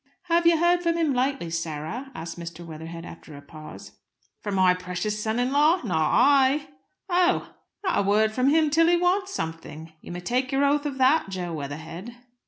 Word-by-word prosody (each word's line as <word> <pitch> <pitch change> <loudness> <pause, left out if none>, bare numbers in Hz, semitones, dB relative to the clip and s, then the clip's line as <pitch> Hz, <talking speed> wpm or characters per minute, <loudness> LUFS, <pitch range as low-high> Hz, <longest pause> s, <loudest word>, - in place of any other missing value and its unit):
"Have 340 -1 +2
you 335 -1 +5
heard 345 +2 +3
from 335 -1 0
him 320 -4 +1
lately, 255 -8 -1
Sarah?" 165 - -4
asked 165 +1 -7
Mr. 170 0 -8
Weatherhead, 165 +1 -8
after 160 -3 -11
a - - -11
pause. 155 +2 -12 0.4
"From 205 -2 -4
my 185 -1 +4
precious 180 +4 -4
son 220 +1 -1
in 245 +1 0
law? 300 +6 +4
Not 160 -8 0
I!" 280 +2 +4 0.4
"Oh!" 360 0 +1 0.3
"Not 370 - +1
a - - +3
word 210 +2 +2
from 255 +4 +1
him 310 0 +3
till 330 +2 +4
he 345 0 +4
wants 375 +2 +1
something. 160 - -6
You - - -10
may 175 - -5
take 250 +7 -1
your 275 +1 +2
oath 290 +1 +1
of 275 -2 -5
that, 265 -1 +3
Jo 180 -3 -4
Weatherhead." 160 +9 -7
240 Hz, 190 wpm, -25 LUFS, -, 0.4 s, you